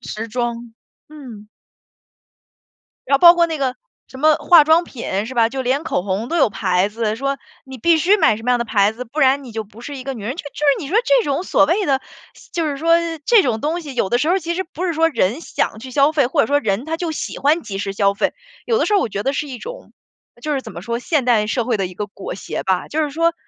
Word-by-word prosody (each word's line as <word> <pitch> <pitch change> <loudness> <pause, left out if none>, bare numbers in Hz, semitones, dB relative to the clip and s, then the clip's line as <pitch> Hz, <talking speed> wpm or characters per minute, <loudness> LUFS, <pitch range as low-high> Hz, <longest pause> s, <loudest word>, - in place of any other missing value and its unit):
时 225 +2 -6
装， 235 0 -4 0.3
嗯。 250 -9 -11 1.6
然 275 - +4
后 - - 0
包 345 -1 +9
括 345 -1 +3
那 325 -2 -4
个 260 -3 -1 0.3
什 260 - -12
么 310 +1 +5
化 340 -1 +6
妆 320 +3 +4
品 220 - -4
是 250 - -7
吧？ 230 -2 +3
就 265 0 -4
连 265 +5 0
口 180 - -1
红 200 +4 -2
都 335 - -3
有 275 - +4
牌 185 0 0
子， 215 0 -2
说 275 +3 -2 0.2
你 265 -1 -10
必 330 +7 +3
须 375 +7 +3
买 220 - +3
什 225 - -11
么 250 - +1
样 245 - +2
的 235 - -1
牌 205 -2 +2
子， 235 +3 -7
不 255 +6 -6
然 275 0 +3
你 245 - -10
就 220 0 -4
不 215 +3 -16
是 285 +2 -7
一 260 - -8
个 270 +1 -4
女 225 -5 -9
人。 240 +6 -3
就 335 - -7
是 290 +1 -5
你 280 - -6
说 365 - -2
这 - - +3
种 285 +3 -1
所 295 - +3
谓 365 +7 +1
的 270 -1 +1 0.5
就 335 -2 -1
是 285 -2 -3
说 330 +3 +3 0.3
这 465 -4 +6
种 240 -9 -1
东 330 +4 -1
西 285 -4 -9
有 195 - 0
的 240 - +2
时 305 - 0
候 370 - +3
其 340 -1 -3
实 375 +2 -2
不 360 0 -6
是 345 - -1
说 325 +1 +2
人 245 - 0
想 220 - -2
去 260 +3 -9
消 280 +4 +3
费， 285 -5 +2
或 280 +3 +2
者 - - 0
说 285 +1 +2
人 220 -1 -1
他 325 +1 -3
就 335 -2 -3
喜 - - -5
欢 305 +4 +2
即 195 - -6
时 195 -1 -3
消 200 0 +2
费。 200 - -1 0.3
有 460 - +1
的 - - +1
时 420 - 0
候 400 - +5
我 235 - -1
觉 200 0 -4
得 270 - 0
是 295 +2 -3
一 260 -3 -7
种 - - -9 0.5
就 300 +4 -2
是 270 - -1
怎 220 - -10
么 170 - -8
说， 235 +2 -3
现 285 0 0
代 220 -4 +3
社 240 +1 -1
会 240 -1 0
的 195 -2 -1
一 180 - -11
个 210 - -3
裹 200 -2 -8
挟 - - -5
吧。 190 -1 -1
就 315 - -1
是 300 - -1
说 330 +3 +1
270 Hz, 295 characters per minute, -19 LUFS, 225-315 Hz, 1.6 s, 包